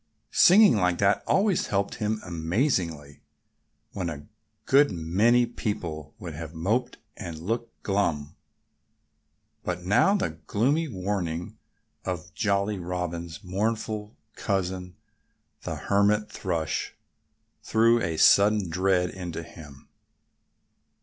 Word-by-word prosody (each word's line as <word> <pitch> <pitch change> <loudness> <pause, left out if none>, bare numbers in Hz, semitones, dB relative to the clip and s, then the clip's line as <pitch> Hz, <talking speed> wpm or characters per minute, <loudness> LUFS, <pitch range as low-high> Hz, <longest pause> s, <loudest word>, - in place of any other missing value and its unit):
Singing 185 - +7
like 90 -2 +1
that 100 +1 +2
always 195 -2 +2
helped 100 0 -1
him 110 0 -1
amazingly, 85 - -1 0.7
when 90 -3 -3
a 75 -2 -7 0.4
good 140 +2 +5
many 100 +8 +2
people 85 -10 -5
would 85 -3 -7
have 80 +1 -8
moped 110 +10 -1 0.2
and 85 -6 -7
looked 115 +7 -3
glum. 85 -8 -1 1.3
But 90 0 -3
now 105 - +4
the 80 - -2
gloomy 140 +10 +1
warning 90 - -3 0.4
of 90 -1 -5
Jolly 100 -1 0
Robin's 85 -1 -4
mournful 105 +2 -3 0.2
cousin, 90 -3 -2 0.7
the - - -4
Hermit 105 +1 +1
Thrush, 85 -5 -3 0.7
threw 115 +1 +3
a 80 -4 -2
sudden 100 -1 +5
dread 90 0 +1
into 85 -3 -6
him. 75 -4 -13
95 Hz, 105 wpm, -26 LUFS, 85-110 Hz, 1.3 s, Singing